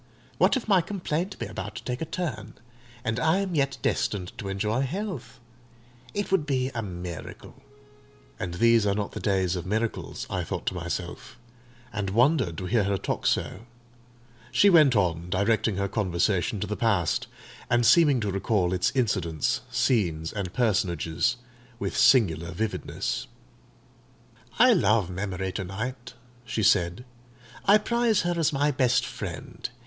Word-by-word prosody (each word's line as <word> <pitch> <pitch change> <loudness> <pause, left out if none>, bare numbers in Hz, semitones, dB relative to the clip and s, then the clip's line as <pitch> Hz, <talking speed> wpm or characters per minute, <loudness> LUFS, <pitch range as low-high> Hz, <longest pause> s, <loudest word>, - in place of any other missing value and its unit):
What - - +4
if 245 - -6
my 195 -4 +5
complaint 180 0 -3
be - - -4
about - - -6
to - - -7
take 125 0 -4
a - - -1
turn, 130 - -5 0.5
and 110 +1 -1
I 160 +6 +3
am 195 -2 -2
yet 140 -3 +1
destined 90 -4 -1
to 100 - -5
enjoy 105 +5 -1
health? 170 - -4 0.8
It 205 -1 -2
would 165 -6 +2
be 130 -2 0
a 115 - -2
miracle!" 90 -4 -8 0.8
"And 85 -1 -4
these 115 +1 +4
are 100 - +1
not 105 -1 -2
the - - -6
days 95 -3 +1
of 90 0 -5
miracles," 110 +3 -2
I - - -2
thought - - -5
to - - 0
myself, 90 +7 -5 0.6
and 100 -1 -2
wondered 120 - +2
to 90 - -4
hear 105 +1 +2
her 100 0 0
talk - - -2
so. 110 +5 -1 0.8
She 200 - +5
went 150 -7 +6
on 85 -3 0
directing 105 +2 +1
her 100 +1 -1
conversation 95 0 0
to - - 0
the 105 - -3
past, 100 -9 +1 0.4
and 120 0 +3
seeming 150 -2 +5
to 105 -2 -1
recall 95 -2 0
its 90 0 +1
incidents, 95 - 0
scenes, 110 - 0
and 100 -4 -3
personages, 100 - 0 0.4
with - - -3
singular 85 - +4
vividness. 105 +4 -3 1.3
"I - - +7
love 105 -5 +2
Memory 95 0 -3
to 95 +2 -4
night," 120 +6 -6 0.3
she 115 -2 -2
said: 90 +2 +2 0.6
"I 200 +2 +7
prize 235 0 +1
her 175 +1 0
as 160 -1 +2
my 145 +1 +1
best 130 -2 +2
friend. - - -6
110 Hz, 155 wpm, -26 LUFS, 95-130 Hz, 1.3 s, I